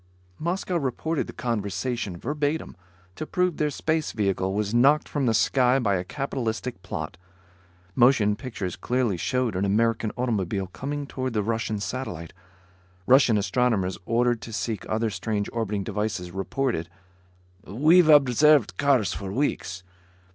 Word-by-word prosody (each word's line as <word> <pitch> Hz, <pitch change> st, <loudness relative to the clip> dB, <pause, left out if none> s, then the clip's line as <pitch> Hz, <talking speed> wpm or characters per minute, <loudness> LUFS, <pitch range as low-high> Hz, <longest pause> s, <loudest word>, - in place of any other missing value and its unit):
Moscow 175 Hz, +2 st, -1 dB
reported 150 Hz, +2 st, -2 dB
the -, -, -7 dB
conversation, 110 Hz, -2 st, -3 dB
verbatim, 145 Hz, -, -2 dB, 0.4 s
to 155 Hz, -, -5 dB
prove 180 Hz, -3 st, 0 dB
their 150 Hz, -, +1 dB
space 155 Hz, +2 st, -1 dB
vehicle 95 Hz, -3 st, 0 dB
was 105 Hz, +1 st, -1 dB
knocked 140 Hz, +6 st, +4 dB
from 140 Hz, -4 st, -1 dB
the 115 Hz, -, +3 dB
sky 125 Hz, +3 st, +3 dB
by 110 Hz, -7 st, +1 dB
a 90 Hz, -, -1 dB
capitalistic 125 Hz, -2 st, -4 dB
plot. 80 Hz, -5 st, -5 dB, 0.8 s
Motion 120 Hz, -4 st, +4 dB
pictures 105 Hz, -8 st, -5 dB
clearly 125 Hz, -5 st, 0 dB
showed 125 Hz, +4 st, -1 dB
an 95 Hz, -, 0 dB
American 110 Hz, +2 st, +1 dB
automobile 100 Hz, -6 st, -1 dB
coming 145 Hz, +9 st, -5 dB
toward 130 Hz, -2 st, -4 dB
the 105 Hz, -2 st, 0 dB
Russian 110 Hz, -1 st, -2 dB
satellite. 100 Hz, -8 st, -5 dB, 0.7 s
Russian 125 Hz, -4 st, +5 dB
astronomers 100 Hz, -2 st, 0 dB
ordered 120 Hz, 0 st, +1 dB
to 115 Hz, -, -8 dB
seek 110 Hz, 0 st, -3 dB
other 110 Hz, 0 st, 0 dB
strange 105 Hz, -1 st, -2 dB
orbiting 105 Hz, -3 st, -2 dB
devices 105 Hz, -4 st, -3 dB
reported: 95 Hz, -2 st, -2 dB, 0.7 s
"We've 155 Hz, -, +4 dB
observed 145 Hz, -, +5 dB
cars 135 Hz, -7 st, +2 dB
for 95 Hz, -2 st, -5 dB
weeks. 95 Hz, -7 st, -2 dB
115 Hz, 135 wpm, -25 LUFS, 100-135 Hz, 0.8 s, Russian